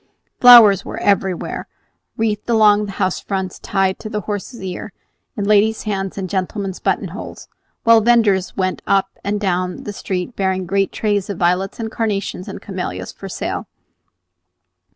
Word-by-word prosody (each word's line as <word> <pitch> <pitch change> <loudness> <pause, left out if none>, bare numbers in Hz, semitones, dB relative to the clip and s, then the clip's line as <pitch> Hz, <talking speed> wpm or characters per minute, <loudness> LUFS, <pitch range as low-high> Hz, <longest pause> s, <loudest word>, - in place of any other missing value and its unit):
Flowers 230 -6 +9
were - - -7
everywhere, 195 -3 -1 0.5
wreathed 215 0 -1
along 210 -2 +4
the 200 - -7
house 185 -2 -1
fronts, 190 -2 -4
tied 195 -1 0
to 215 - -7
the 210 -1 -3
horses' 205 +3 -5
ears, 185 +2 -5 0.5
in 205 - -1
ladies' 215 +2 +3
hands 195 -3 -3
and 190 -2 -3
gentlemen's 190 +1 -3
button - - -1
holes, - - -9 0.4
while 230 -1 +6
venders 215 -5 +2
went 185 -1 -1
up 195 -1 +2
and 205 +1 -1
down 180 -2 -2
the 205 - -6
street 190 +3 -4
bearing 190 -1 -1
great 195 +2 0
trays 205 -3 -1
of 200 - -4
violets 180 +4 0
and 220 -1 -4
carnations 200 -4 -2
and - - -8
camellias - - -5
for - - -9
sale. - - -4
200 Hz, 155 wpm, -19 LUFS, 190-215 Hz, 0.5 s, Flowers